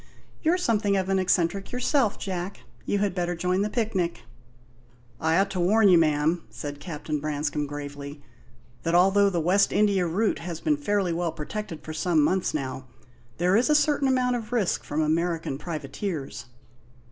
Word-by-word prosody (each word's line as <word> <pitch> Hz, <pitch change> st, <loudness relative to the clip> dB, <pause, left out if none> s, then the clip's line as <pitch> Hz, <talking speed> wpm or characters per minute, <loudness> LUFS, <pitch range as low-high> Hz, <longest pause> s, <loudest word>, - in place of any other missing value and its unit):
You're 340 Hz, +3 st, +2 dB
something 210 Hz, -, +1 dB
of 190 Hz, 0 st, -1 dB
an 195 Hz, 0 st, +2 dB
eccentric 185 Hz, +1 st, 0 dB
yourself, 250 Hz, -2 st, +1 dB
Jack. 185 Hz, 0 st, -5 dB, 0.3 s
You 205 Hz, -, +1 dB
had 200 Hz, -2 st, 0 dB
better 175 Hz, -1 st, -1 dB
join 180 Hz, +3 st, 0 dB
the 210 Hz, -, 0 dB
picnic." 205 Hz, -7 st, -1 dB, 1.0 s
"I 160 Hz, +1 st, +2 dB
ought 195 Hz, +1 st, +2 dB
to 185 Hz, -, -3 dB
warn 205 Hz, +4 st, +4 dB
you, 175 Hz, -2 st, +7 dB
ma'am," 155 Hz, +2 st, +2 dB
said 145 Hz, -1 st, -7 dB
Captain 150 Hz, -1 st, -4 dB
Branscome 150 Hz, 0 st, -2 dB
gravely, 145 Hz, 0 st, -7 dB, 0.6 s
"that 165 Hz, +1 st, 0 dB
although 195 Hz, +3 st, +5 dB
the 175 Hz, -3 st, -1 dB
West 185 Hz, +5 st, +3 dB
India 200 Hz, -4 st, +2 dB
route 200 Hz, +6 st, 0 dB
has 170 Hz, -1 st, -5 dB
been 300 Hz, -1 st, +1 dB
fairly 205 Hz, -10 st, 0 dB
well 170 Hz, 0 st, -1 dB
protected 165 Hz, 0 st, -6 dB
for 155 Hz, -, -6 dB
some 165 Hz, 0 st, +1 dB
months 185 Hz, +4 st, +1 dB
now, 130 Hz, -2 st, -4 dB, 0.5 s
there 180 Hz, +2 st, +2 dB
is 240 Hz, +6 st, +3 dB
a 300 Hz, -, +5 dB
certain 295 Hz, -2 st, +3 dB
amount 250 Hz, -1 st, +2 dB
of 225 Hz, -1 st, -8 dB
risk 225 Hz, -7 st, 0 dB
from 155 Hz, +2 st, -1 dB
American 160 Hz, -2 st, -1 dB
privateers." 155 Hz, -1 st, -5 dB
180 Hz, 170 wpm, -26 LUFS, 155-205 Hz, 1.0 s, you